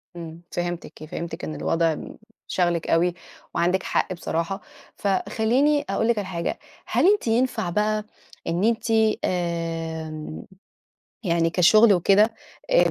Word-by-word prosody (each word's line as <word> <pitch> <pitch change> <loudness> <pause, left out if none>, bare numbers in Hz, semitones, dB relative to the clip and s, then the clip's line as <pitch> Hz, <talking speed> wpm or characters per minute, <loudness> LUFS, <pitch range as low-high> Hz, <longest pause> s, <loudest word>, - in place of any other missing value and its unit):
إمم، 165 -1 -8
فهمتِك، 175 -2 -4
فهمتِك، 165 - -6
إن 80 -1 -4
الوضع 160 - +1
م - - -9 0.3
شاغلِك 175 -2 0
أوي 170 +2 +3 0.4
وعندِك 180 +2 +2
حق - - 0
بصراحة. 170 +2 -3 0.3
فخلّيني 225 +9 +1
أقول 195 +3 +1
لِك 235 -1 +2
على 205 -2 -2
حاجة، 170 -3 -3 0.3
هل - - +2
أنتِ 415 - -3
ينفع 230 -5 +1
بقى 210 +3 0 0.4
إن 170 +3 0
أنتِ، 230 +1 +1 0.4
آمم، 165 - -3 0.8
يعني 170 -4 +2
كشغل 210 +6 +6
وكده، 200 +5 +4 0.4
آآ، - - +5
175 Hz, 125 wpm, -24 LUFS, 165-215 Hz, 0.8 s, كشغل